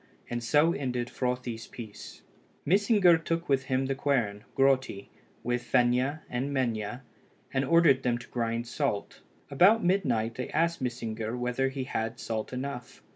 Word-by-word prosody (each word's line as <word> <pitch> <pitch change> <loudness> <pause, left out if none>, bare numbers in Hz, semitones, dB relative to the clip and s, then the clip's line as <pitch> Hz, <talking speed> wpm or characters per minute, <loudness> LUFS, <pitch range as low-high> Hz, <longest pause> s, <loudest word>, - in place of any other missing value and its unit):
And 120 0 -2
so 150 +7 +3
ended 125 -4 -2
Frothi's 125 -3 -3
peace. 110 -4 -10 0.4
Mysingr 195 -1 +4
took 165 +1 -2
with 135 -2 +1
him 130 0 0
the 135 - 0
quern, 120 -7 -1
Grotti, 135 -7 +2 0.3
with 120 0 -1
Fenia 125 +5 +1
and 130 +3 -3
Menia, 120 -2 -2 0.5
and 135 - +1
ordered 150 -2 +4
them 120 -2 +1
to 120 - -11
grind 115 -1 -2
salt. 120 -4 -3 0.3
About 195 +10 +5
midnight 130 - +1
they 125 +2 -5
asked 170 -2 0
Mysingr 115 -2 -3
whether 125 +2 0
he 135 0 -4
had 115 -2 -3
salt 110 -1 -4
enough. 125 -1 -6
125 Hz, 145 wpm, -29 LUFS, 120-140 Hz, 0.5 s, About